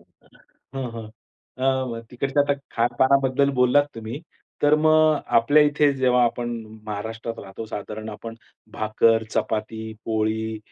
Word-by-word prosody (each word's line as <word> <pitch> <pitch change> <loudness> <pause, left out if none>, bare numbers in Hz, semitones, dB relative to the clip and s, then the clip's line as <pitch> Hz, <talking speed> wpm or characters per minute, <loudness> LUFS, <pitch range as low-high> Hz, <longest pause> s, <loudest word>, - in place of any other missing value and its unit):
हां, 135 -1 -11
हां. 115 -1 -6 0.5
अ, 130 - -2 0.2
मग, 115 -1 -5
तिकडच्या 135 +3 +1
तर 145 - +3 0.2
खाणपानाबद्दल 130 +3 +3
बोललात 125 +3 +5
तुम्ही. 115 +6 -6 0.4
तर 145 +1 +5
मग 155 -1 +5 0.2
आपल्या 145 +6 +5
इथे 145 -1 +3
जेव्हा 125 -2 +3
आपण 120 0 -1 0.4
महाराष्ट्रात 110 +2 -5
राहतो 95 +3 -8
साधारण 110 +1 -6
आपण 115 +2 -8 0.4
भाकर, 110 +1 +2
चपाती, 110 0 -3
पोळी 110 0 -1
115 Hz, 125 wpm, -23 LUFS, 110-140 Hz, 0.5 s, बोललात